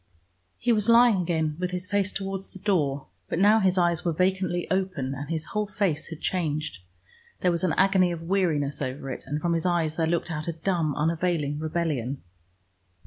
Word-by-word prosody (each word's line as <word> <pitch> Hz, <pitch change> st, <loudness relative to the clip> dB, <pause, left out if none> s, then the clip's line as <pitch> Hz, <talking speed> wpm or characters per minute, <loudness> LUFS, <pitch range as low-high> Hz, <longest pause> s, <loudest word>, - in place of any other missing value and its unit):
He 245 Hz, -, +1 dB
was 215 Hz, -1 st, +1 dB
lying 230 Hz, -4 st, +6 dB
again 160 Hz, -3 st, -1 dB
with 180 Hz, 0 st, -1 dB
his 180 Hz, 0 st, -3 dB
face 200 Hz, 0 st, 0 dB
towards 195 Hz, 0 st, -4 dB
the -, -, -12 dB
door, 155 Hz, -9 st, 0 dB, 0.2 s
but -, -, -1 dB
now 205 Hz, +4 st, +5 dB
his 190 Hz, -2 st, +2 dB
eyes 175 Hz, -1 st, +2 dB
were 170 Hz, -, +1 dB
vacantly 185 Hz, 0 st, 0 dB
open, 185 Hz, -9 st, -1 dB
and 140 Hz, +2 st, -6 dB
his 160 Hz, -1 st, -2 dB
whole 210 Hz, 0 st, 0 dB
face 185 Hz, -7 st, -1 dB
had 165 Hz, -2 st, -8 dB
changed. 155 Hz, -, -2 dB, 0.6 s
There 180 Hz, -, +3 dB
was 170 Hz, +1 st, -2 dB
an 180 Hz, -, +2 dB
agony 190 Hz, -2 st, +4 dB
of 165 Hz, -1 st, -5 dB
weariness 160 Hz, -6 st, 0 dB
over 135 Hz, 0 st, -4 dB
it, -, -, -6 dB
and 145 Hz, +2 st, -2 dB
from 170 Hz, +2 st, 0 dB
his 165 Hz, +1 st, 0 dB
eyes 165 Hz, -3 st, 0 dB
there 165 Hz, -1 st, +1 dB
looked 170 Hz, +1 st, -1 dB
out 155 Hz, -1 st, -4 dB
a 170 Hz, -, -1 dB
dumb, 165 Hz, -3 st, -1 dB
unavailing 160 Hz, -2 st, 0 dB
rebellion. 155 Hz, -5 st, -2 dB
170 Hz, 195 wpm, -26 LUFS, 155-190 Hz, 0.6 s, lying